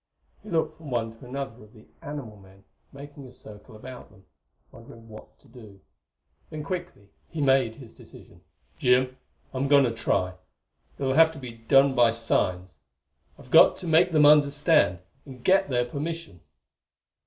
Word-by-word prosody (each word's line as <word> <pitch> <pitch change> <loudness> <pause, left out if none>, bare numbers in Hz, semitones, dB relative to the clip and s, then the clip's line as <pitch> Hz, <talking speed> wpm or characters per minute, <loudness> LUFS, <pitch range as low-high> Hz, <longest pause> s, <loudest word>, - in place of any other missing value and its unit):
He 215 - -13
looked 160 -2 -1
from 160 -3 -11
one 115 -2 -3
to 125 - -13
another 130 -3 -7
of 105 - -19
the 110 -2 -18 0.2
animal 140 -7 -8
men 95 -1 -19 0.3
making 140 0 -12
a - - -14
circle 105 -3 -13
about 125 +4 -11
them, 95 0 -22 0.5
wondering 115 -1 -15
what 110 -1 -14
to - - -23
do; 110 -5 -15 0.7
then 155 -1 -7
quickly 175 - -7 0.2
he 160 - -7
made 135 -5 +2
his 125 -6 -14
decision. - - -16 0.4
"Jim, 125 +1 +2 0.4
I'm 135 +1 -2
going 140 0 +5
to 120 -3 0
try. 95 -5 -1 0.6
It'll 135 -1 -1
have 160 +2 +5
to - - -12
be 130 -3 -8
done 135 +4 +3
by 120 -2 +4
signs; 90 -7 -2 0.6
I've - - -17
got - - +6
to - - -8
make 165 +3 +3
them 155 -2 +4
understand, 145 - +3 0.2
and 130 -3 -14
get 190 -4 +3
their 120 -2 0
permission." 160 - -6
130 Hz, 165 wpm, -25 LUFS, 115-145 Hz, 0.7 s, got